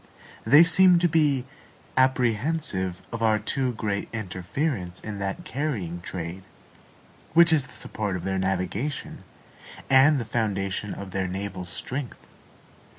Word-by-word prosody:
They 150 Hz, +4 st, +9 dB
seem 180 Hz, +1 st, +6 dB
to 175 Hz, +1 st, +3 dB
be 150 Hz, -6 st, +2 dB, 0.5 s
apprehensive 125 Hz, -, +1 dB
of 115 Hz, -, -5 dB
our 110 Hz, -1 st, +3 dB
too 130 Hz, +3 st, -1 dB
great 105 Hz, -2 st, -3 dB
interference 95 Hz, -, -3 dB
in 105 Hz, -2 st, -6 dB
that 95 Hz, 0 st, -4 dB
carrying 105 Hz, -, -3 dB
trade, 85 Hz, +1 st, -6 dB, 0.9 s
which 170 Hz, -1 st, +7 dB
is 145 Hz, -5 st, +2 dB
the -, -, -15 dB
support 105 Hz, -3 st, -2 dB
of 90 Hz, -, -5 dB
their 95 Hz, 0 st, -1 dB
navigation 95 Hz, +9 st, -2 dB, 0.7 s
and 135 Hz, +2 st, +6 dB
the 120 Hz, -, -3 dB
foundation 105 Hz, -3 st, -2 dB
of 100 Hz, -1 st, -8 dB
their 95 Hz, 0 st, -1 dB
naval 95 Hz, 0 st, -5 dB
strength. 125 Hz, +9 st, -5 dB
110 Hz, 130 wpm, -25 LUFS, 95-140 Hz, 0.9 s, They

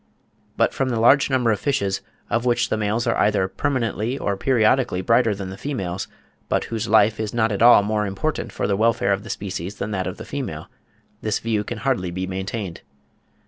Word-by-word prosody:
But -, -, +2 dB
from 135 Hz, -1 st, -1 dB
the 120 Hz, -3 st, -1 dB
large 135 Hz, +6 st, +5 dB
number 125 Hz, -4 st, +2 dB
of 105 Hz, -, 0 dB
fishes, 115 Hz, -9 st, 0 dB, 0.3 s
of 120 Hz, -, 0 dB
which 120 Hz, -1 st, +1 dB
the -, -, +1 dB
males 110 Hz, +2 st, -1 dB
are 115 Hz, -, +1 dB
either 100 Hz, -2 st, +2 dB
permanently 115 Hz, +2 st, -1 dB
or 100 Hz, -7 st, -1 dB
periodically 120 Hz, -1 st, +2 dB
brighter 115 Hz, +2 st, +3 dB
than 95 Hz, -1 st, -6 dB
the 95 Hz, -, -9 dB
females, 95 Hz, -10 st, -3 dB, 0.4 s
but -, -, +1 dB
whose 115 Hz, 0 st, -3 dB
life 110 Hz, 0 st, +4 dB
is 110 Hz, 0 st, -3 dB
not 110 Hz, -1 st, +2 dB
at 100 Hz, -, -2 dB
all 120 Hz, -3 st, +8 dB
more 105 Hz, 0 st, 0 dB
important 100 Hz, +11 st, -3 dB
for -, -, -3 dB
the 100 Hz, -, +1 dB
welfare 110 Hz, -1 st, +2 dB
of 95 Hz, -, -2 dB
the 115 Hz, -, -10 dB
species 95 Hz, -1 st, -4 dB
than 105 Hz, +1 st, -4 dB
that 95 Hz, -3 st, -2 dB
of -, -, -5 dB
the -, -, -8 dB
female, -, -, -5 dB, 0.5 s
this 110 Hz, -, 0 dB
view 110 Hz, -2 st, -1 dB
can 120 Hz, -, -5 dB
hardly 115 Hz, -7 st, -1 dB
be 95 Hz, +2 st, -3 dB
maintained. 95 Hz, 0 st, -5 dB
110 Hz, 205 wpm, -22 LUFS, 100-120 Hz, 0.5 s, all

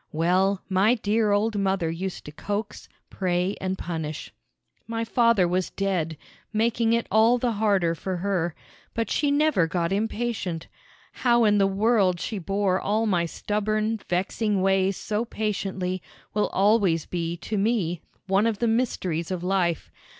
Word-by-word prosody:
Well, 185 Hz, +4 st, +1 dB
my 200 Hz, +5 st, +3 dB
dear 215 Hz, -1 st, +1 dB
old 205 Hz, +1 st, +1 dB
mother 190 Hz, -4 st, 0 dB
used 185 Hz, +3 st, -5 dB
to 150 Hz, -, -8 dB
coax, 205 Hz, +6 st, -5 dB, 0.2 s
pray, 180 Hz, +1 st, 0 dB
and 190 Hz, 0 st, -2 dB
punish. 160 Hz, -4 st, -5 dB, 0.5 s
My 230 Hz, 0 st, -2 dB
father 230 Hz, -5 st, +3 dB
was 180 Hz, +1 st, 0 dB
dead, 180 Hz, -5 st, -2 dB, 0.3 s
making 230 Hz, +1 st, +1 dB
it 235 Hz, 0 st, +1 dB
all 225 Hz, +3 st, +5 dB
the 245 Hz, 0 st, 0 dB
harder 200 Hz, -6 st, +2 dB
for 185 Hz, +2 st, -4 dB
her, 175 Hz, -3 st, -1 dB, 0.4 s
but 230 Hz, 0 st, -1 dB
she 290 Hz, -, +1 dB
never 285 Hz, -, +3 dB
got 170 Hz, 0 st, -1 dB
impatient. 210 Hz, -4 st, -2 dB, 0.5 s
How 240 Hz, -2 st, +2 dB
in 210 Hz, -1 st, +4 dB
the 195 Hz, -, +4 dB
world 195 Hz, -2 st, +2 dB
she 210 Hz, +3 st, -3 dB
bore 195 Hz, +1 st, 0 dB
all 215 Hz, +2 st, +1 dB
my 175 Hz, -5 st, +1 dB
stubborn, 215 Hz, +4 st, -1 dB
vexing 195 Hz, +2 st, 0 dB
ways 195 Hz, 0 st, +2 dB
so 215 Hz, +1 st, -2 dB
patiently 195 Hz, -5 st, -3 dB, 0.3 s
will 210 Hz, -, +1 dB
always 195 Hz, -5 st, +2 dB
be 170 Hz, -1 st, -3 dB
to 215 Hz, -, -5 dB
me 195 Hz, -6 st, 0 dB, 0.2 s
one 195 Hz, +3 st, +2 dB
of 225 Hz, -3 st, 0 dB
the 235 Hz, -, 0 dB
mysteries 190 Hz, -8 st, -1 dB
of 180 Hz, -2 st, -3 dB
life. 180 Hz, -3 st, 0 dB
195 Hz, 150 wpm, -25 LUFS, 180-220 Hz, 0.5 s, all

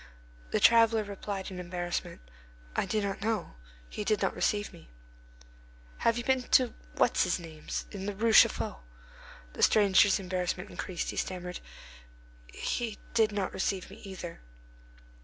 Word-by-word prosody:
The -, -, +1 dB
traveller 230 Hz, -1 st, +5 dB
replied 200 Hz, -1 st, -5 dB
with 185 Hz, -, -6 dB
embarrassment: 175 Hz, -, -4 dB, 0.5 s
"I -, -, 0 dB
do 215 Hz, +2 st, 0 dB
not 200 Hz, 0 st, -3 dB
know. 215 Hz, -, -1 dB, 0.3 s
He 210 Hz, -, -5 dB
did 210 Hz, -1 st, +1 dB
not -, -, 0 dB
receive 205 Hz, 0 st, 0 dB
me." 80 Hz, -7 st, -15 dB, 1.1 s
"Have 230 Hz, 0 st, +2 dB
you 240 Hz, -, -2 dB
been 260 Hz, 0 st, +2 dB
to 250 Hz, 0 st, +3 dB, 0.2 s
What's -, -, +3 dB
his -, -, +1 dB
name's, 160 Hz, -3 st, -6 dB
in 195 Hz, -1 st, -6 dB
the 205 Hz, -, -3 dB
Rue 225 Hz, +2 st, +1 dB
Chaffaut?" -, -, +5 dB, 0.7 s
The -, -, -6 dB
stranger's 200 Hz, -1 st, +5 dB
embarrassment 180 Hz, -1 st, -3 dB
increased; 180 Hz, -3 st, -4 dB
he -, -, -9 dB
stammered, 180 Hz, -1 st, -3 dB, 0.9 s
"He 225 Hz, -, -3 dB, 0.2 s
did 220 Hz, -2 st, +3 dB
not 200 Hz, -2 st, -2 dB
receive 190 Hz, 0 st, -2 dB
me 200 Hz, -, -11 dB
either." 185 Hz, -4 st, -8 dB
200 Hz, 145 wpm, -30 LUFS, 180-220 Hz, 1.1 s, traveller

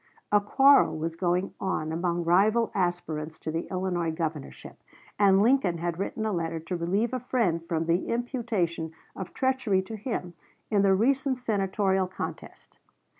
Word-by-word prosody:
A 205 Hz, 0 st, +5 dB
quarrel 270 Hz, -, +5 dB
was 165 Hz, +1 st, -3 dB
going 180 Hz, +2 st, 0 dB
on 160 Hz, -5 st, -1 dB
among 170 Hz, +1 st, -1 dB
rival 210 Hz, +7 st, +3 dB
aspirants 160 Hz, -4 st, -2 dB
to 160 Hz, -, -5 dB
the 165 Hz, +1 st, -3 dB
Illinois 180 Hz, -3 st, -1 dB
governorship, 160 Hz, -3 st, -5 dB, 0.4 s
and 195 Hz, -1 st, +5 dB
Lincoln 230 Hz, -8 st, +3 dB
had 170 Hz, +1 st, -3 dB
written 220 Hz, +2 st, -3 dB
a 215 Hz, -, 0 dB
letter 165 Hz, -2 st, -2 dB
to 165 Hz, +3 st, -5 dB
relieve 195 Hz, +8 st, 0 dB
a 255 Hz, -, 0 dB
friend 225 Hz, -10 st, 0 dB
from 165 Hz, -1 st, -2 dB
the 170 Hz, +2 st, +1 dB
imputation 225 Hz, -, -2 dB, 0.2 s
of 185 Hz, -2 st, -6 dB
treachery 260 Hz, -8 st, +1 dB
to 220 Hz, +4 st, -7 dB
him 210 Hz, -5 st, -4 dB, 0.4 s
in 205 Hz, -2 st, +4 dB
the 195 Hz, -1 st, +4 dB
recent 265 Hz, +5 st, +1 dB
Senatorial 195 Hz, -4 st, 0 dB
contest. 185 Hz, -, -8 dB
190 Hz, 155 wpm, -27 LUFS, 170-220 Hz, 0.4 s, A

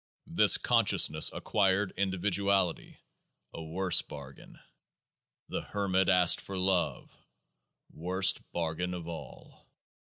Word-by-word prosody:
This -, -, +4 dB
consciousness 80 Hz, +1 st, +3 dB
acquired 100 Hz, -1 st, -1 dB
individuality: 95 Hz, -1 st, -2 dB, 0.6 s
a -, -, -9 dB
worse 90 Hz, +3 st, +1 dB
bargain. 70 Hz, -2 st, -13 dB, 0.9 s
The -, -, -4 dB
Hermit 95 Hz, -2 st, -2 dB
asked 90 Hz, -2 st, +4 dB
for 95 Hz, -, -8 dB
love; 90 Hz, -1 st, -2 dB, 0.8 s
worst 95 Hz, +3 st, 0 dB
bargain 85 Hz, +2 st, -4 dB
of 85 Hz, -2 st, -9 dB
all. 80 Hz, -6 st, -12 dB
90 Hz, 95 wpm, -29 LUFS, 85-95 Hz, 0.9 s, This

